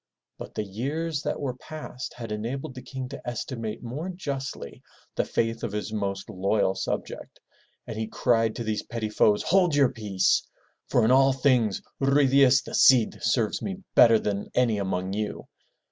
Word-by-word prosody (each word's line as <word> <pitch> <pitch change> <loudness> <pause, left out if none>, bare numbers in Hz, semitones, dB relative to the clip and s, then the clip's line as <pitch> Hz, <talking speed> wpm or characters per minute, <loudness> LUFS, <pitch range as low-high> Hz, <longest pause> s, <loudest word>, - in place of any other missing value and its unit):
'' - - -62
But - - -9
the 110 - -1
years 140 +10 -3
that - - -3
were 135 -3 -2
past 130 -1 -8
had 115 -3 -7
enabled 130 +7 -4
the 130 - -8
King 130 -1 -6
to 140 - -8
estimate 115 -2 -5
more 140 +10 -5
justly 140 -7 -5 0.3
the - - 0
faith 115 0 -1
of 115 -4 -3
his 105 +1 -4
most 100 -2 -3
loyal 95 +1 +1
subject, 95 - -5 0.5
and - - -6
he 110 - -2
cried 115 -1 +1
to 120 - -4
these 110 -1 -1
petty 115 -2 -4
foes, 105 -1 +3
Hold 180 -4 +3
your 140 -3 +4
peace! 105 -6 +1 0.5
For - - +3
in 115 - +3
all 135 +1 +5
things, 125 -6 +2 0.2
Ruy 140 +1 +4
Diaz 135 -1 +5
the - - -9
Cid 125 -4 +5
serves 115 -4 +1
me 195 0 -5
better 115 -2 +7
than 100 -2 -3
any 115 -4 +2
among 95 -1 -2
you!" 105 +1 -4
120 Hz, 175 wpm, -26 LUFS, 105-135 Hz, 0.5 s, better